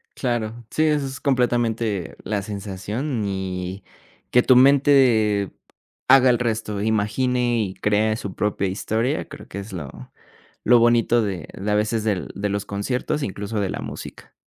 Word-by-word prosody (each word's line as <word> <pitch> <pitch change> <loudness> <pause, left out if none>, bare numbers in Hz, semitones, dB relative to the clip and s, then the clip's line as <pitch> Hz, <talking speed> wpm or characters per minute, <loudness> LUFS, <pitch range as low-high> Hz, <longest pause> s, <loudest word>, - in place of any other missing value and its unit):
Claro. 120 -2 -3
Sí, 155 - +1
eso 150 -2 +1
es 135 0 -6
completamente 120 - 0
la 105 -2 -2
sensación, 105 +5 -4
y 95 0 -4 0.5
que 125 - +6
tu 130 - +5
mente 125 -7 +4 0.6
haga 130 -1 +7
el 120 - +3
resto, 110 -4 -2
imagine 120 +3 +1
y 95 -2 -4
cree 105 +1 +1
su 100 -4 -6
propia 100 -2 -1
historia. 110 +8 -1
Creo 145 - -11
que 100 - -7
es 100 +1 -8
lo 70 -7 -8 0.5
lo 120 +1 +6
bonito 120 0 +3
de 95 -6 -4
de, 105 +2 -3
a - - +2
veces, 110 +1 0
de 105 -5 -1
de 100 +1 -2
los 100 0 -2
conciertos, 125 +9 -2
incluso 105 0 -4
de 95 - -1
la - - -4
música. - - -9
110 Hz, 160 wpm, -22 LUFS, 100-125 Hz, 0.6 s, haga